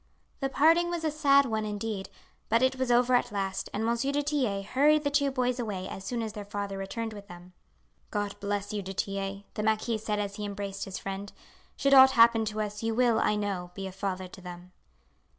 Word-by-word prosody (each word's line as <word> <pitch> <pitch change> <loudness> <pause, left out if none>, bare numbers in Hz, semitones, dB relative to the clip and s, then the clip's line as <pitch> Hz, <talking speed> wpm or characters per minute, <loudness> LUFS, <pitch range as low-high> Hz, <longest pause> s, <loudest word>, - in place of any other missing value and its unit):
The 270 - -1
parting 330 +5 +4
was 345 -1 -3
a 310 - +1
sad 280 -2 +4
one 220 -3 -1
indeed, 210 -2 -4 0.4
but 230 +3 +3
it 260 0 +2
was 260 -1 -1
over 245 +1 +4
at 245 - +2
last, 195 -1 -3
and 215 +2 -2
Monsieur 235 +4 0
du 290 +1 0
Tillet 250 -10 -1
hurried 295 +6 +3
the 285 - 0
two 285 -1 +2
boys 250 -2 -1
away 200 -5 -3
as 190 - -7
soon 230 +3 -3
as 220 -2 -5
their 210 -2 -6
father 200 -1 -4
returned 220 +4 -4
with 200 -1 -10
them. 175 0 -12 0.6
"God 205 -1 -2
bless 205 +1 -3
you, 205 - -2
du 195 0 -6
Tillet!" 195 0 -3
the - - -3
marquis 220 +1 0
said 215 -1 -2
as 200 0 -3
he 210 - -5
embraced 200 -1 -5
his 190 -1 -6
friend. 195 +1 -6 0.5
"Should 275 0 +2
aught 265 0 +9
happen 230 -2 +6
to 215 0 -2
us, 210 0 -4
you 225 0 -1
will, 240 -2 +3
I 210 - +2
know, 200 -4 -3
be 195 - -5
a 190 - -5
father 190 -1 -4
to 185 - -13
them." 180 0 -10
215 Hz, 220 wpm, -29 LUFS, 195-250 Hz, 0.6 s, aught